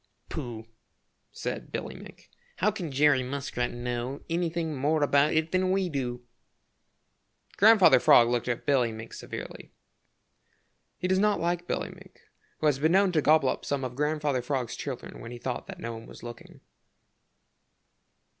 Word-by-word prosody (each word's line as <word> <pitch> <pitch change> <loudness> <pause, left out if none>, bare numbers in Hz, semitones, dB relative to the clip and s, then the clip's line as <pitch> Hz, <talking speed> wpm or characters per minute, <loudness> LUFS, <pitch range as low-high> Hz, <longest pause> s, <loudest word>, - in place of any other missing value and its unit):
"Pooh," 115 -2 -6 0.7
said - - -5
Billy - - -4
Mink, - - -14 0.2
"how 210 +4 +2
can 180 -7 -5
Jerry 140 -1 +4
Muskrat 125 -2 -3
know 120 +2 -4
anything 165 -2 -1
more 145 +3 +1
about 145 +1 +3
it 160 +1 +1
than 185 0 +1
we 190 -1 +1
do?" 125 -4 -3 1.3
Grandfather 210 - +7
Frog 120 -1 +6
looked 120 0 -1
at 120 -1 -2
Billy 130 -5 +2
Mink 110 +1 -9
severely. - - -8 1.2
He 180 - -2
does 185 0 +2
not 210 0 +2
like 175 +1 -1
Billy - - -2
Mink, - - -15 0.4
who - - -3
has 145 -3 +3
been 160 +4 +3
known 195 0 +4
to 160 -3 +2
gobble 150 -3 +4
up - - -3
some 140 -1 -2
of 125 -1 -4
Grandfather 150 -2 0
Frog's 125 -2 -2
children 135 -4 -6
when 115 - -8
he 120 - -7
thought 125 0 -4
that - - -9
no 115 0 -5
one 115 0 -9
was - - -13
looking. 120 0 -10
140 Hz, 160 wpm, -28 LUFS, 125-165 Hz, 1.3 s, Grandfather